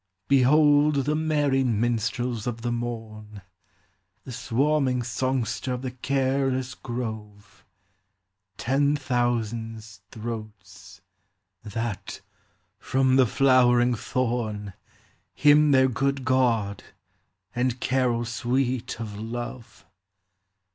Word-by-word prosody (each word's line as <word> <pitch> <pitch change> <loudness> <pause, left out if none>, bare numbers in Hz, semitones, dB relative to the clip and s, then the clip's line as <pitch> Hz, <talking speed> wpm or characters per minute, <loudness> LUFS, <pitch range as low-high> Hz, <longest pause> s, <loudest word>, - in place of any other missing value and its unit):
44 140 - +6
Behold 145 +2 +4
the 150 - +1
merry 145 -4 +1
minstrels 120 0 -1
of 115 -1 -4
the 120 - -1
morn, 110 -4 -6 0.8
The - - -9
swarming 130 +1 0
songster 130 +2 -2
of 125 +1 -5
the 130 - -3
careless 130 0 -1
grove, 105 -5 -7 0.9
Ten 140 +4 +1
thousands 115 -5 -2
throats! 100 -5 -9 0.6
that, 115 0 -5 0.6
from 130 +3 +1
the 130 -2 +5
flowering* 125 -1 +4
thorn, 110 -4 -2 0.6
Hymn 150 0 +5
their 130 -2 +5
good 135 +1 -1
God, 115 -6 +1 0.7
and 125 0 0
carol 125 -2 0
sweet 125 +1 -2
of 105 -3 -6
love. 115 -2 -7
120 Hz, 95 wpm, -25 LUFS, 110-130 Hz, 0.9 s, 44